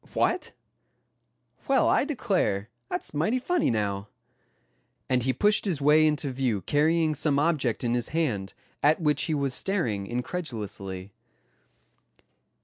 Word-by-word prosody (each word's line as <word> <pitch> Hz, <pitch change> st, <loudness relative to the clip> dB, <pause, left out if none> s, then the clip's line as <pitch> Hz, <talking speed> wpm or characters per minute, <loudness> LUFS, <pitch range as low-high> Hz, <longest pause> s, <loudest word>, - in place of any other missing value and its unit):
What! 360 Hz, -, 0 dB, 1.1 s
Well, 270 Hz, -2 st, +3 dB
I -, -, +3 dB
declare 185 Hz, -, -1 dB, 0.2 s
that's -, -, -4 dB
mighty 165 Hz, +12 st, +1 dB
funny 345 Hz, +6 st, +1 dB
now," 100 Hz, -2 st, -1 dB, 1.0 s
and 125 Hz, -1 st, +2 dB
he 130 Hz, +2 st, +1 dB
pushed 210 Hz, -, +2 dB
his 175 Hz, -8 st, 0 dB
way 150 Hz, +2 st, +5 dB
into 150 Hz, -2 st, 0 dB
view 125 Hz, -6 st, -1 dB
carrying 155 Hz, -, +2 dB
some 150 Hz, -1 st, +1 dB
object 145 Hz, -7 st, +1 dB
in 120 Hz, -1 st, +1 dB
his 120 Hz, -1 st, -1 dB
hand, 125 Hz, -12 st, -1 dB, 0.3 s
at 150 Hz, +2 st, +4 dB
which 150 Hz, -3 st, +1 dB
he 160 Hz, -, 0 dB
was 140 Hz, -2 st, -1 dB
staring 120 Hz, -, -1 dB
incredulously. 105 Hz, -, -5 dB
145 Hz, 130 wpm, -27 LUFS, 115-165 Hz, 1.1 s, way